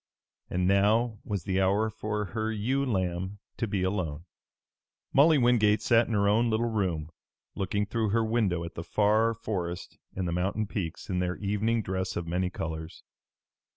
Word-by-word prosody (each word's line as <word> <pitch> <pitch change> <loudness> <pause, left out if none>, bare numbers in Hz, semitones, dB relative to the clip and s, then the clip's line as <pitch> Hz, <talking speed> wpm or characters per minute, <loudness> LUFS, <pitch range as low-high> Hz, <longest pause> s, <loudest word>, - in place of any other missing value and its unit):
And 90 0 0
now 105 +3 +3
was 100 -5 -3
the 95 +1 0
hour 100 +4 +2
for 105 -1 -3
her 110 -1 -1
ewe 125 +6 0
lamb 95 -4 -1 0.2
to 115 - -1
be 100 -2 -1
alone. 90 -5 -2 0.9
Molly 150 +3 +6
Wingate 110 -4 +3
sat 115 +1 +4
in 115 - -3
her 100 -1 +3
own 115 +3 +3
little 115 +1 +1
room, 85 -7 -1 0.4
looking 100 +2 -1
through 110 +1 -1
her 115 +2 +2
window 105 -7 +1
at 85 - -7
the 85 - -6
far 110 +4 +2
forest 90 -5 -4 0.2
and 95 -1 -2
the - - -1
mountain 95 +5 0
peaks 90 -5 -5
in 90 -2 -1
their 90 0 -1
evening 105 +3 0
dress 95 0 -2
of 85 - -2
many 90 +2 -1
colors. 80 -2 -6
100 Hz, 170 wpm, -28 LUFS, 90-110 Hz, 0.9 s, Molly